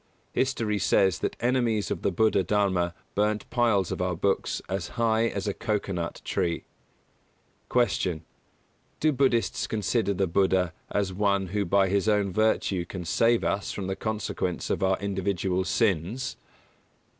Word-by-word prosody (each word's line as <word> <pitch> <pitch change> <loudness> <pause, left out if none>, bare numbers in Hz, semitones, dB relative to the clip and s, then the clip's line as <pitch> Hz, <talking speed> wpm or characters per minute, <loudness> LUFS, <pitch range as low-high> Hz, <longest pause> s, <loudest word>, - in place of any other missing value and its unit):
History 115 -6 0
says 95 -2 +3
that - - -2
enemies 120 -4 +1
of - - -2
the - - +1
Buddha 105 +1 +3
Dharma 95 -4 +1 0.2
burnt 105 0 0
piles 115 -7 +2
of - - -3
our 90 -1 0
books 95 +4 0
as 95 -2 -3
high 115 0 +3
as 100 -2 -3
a 100 - 0
coco 105 -2 -2
nut 85 -2 -4
tree. 85 -1 -1 1.1
168. 95 -8 +1 0.8
Q. 155 - +3
_Do - - -4
Buddhists 125 -3 +1
consider 105 0 0
the 95 - +1
Buddha 95 -1 +2 0.2
as 100 -2 -1
one 100 -1 +1
who 100 +1 -1
by 95 +2 +3
his 100 +3 +1
own 100 -3 +1
virtue 105 -3 +1
can 90 0 -7
save 115 +7 +3
us 100 - -1
from 100 - -4
the 95 0 -2
consequence 105 -5 -3
of - - -1
our 95 0 +2
individual 95 -1 -1
sins? 110 +5 0
100 Hz, 155 wpm, -27 LUFS, 95-110 Hz, 1.1 s, says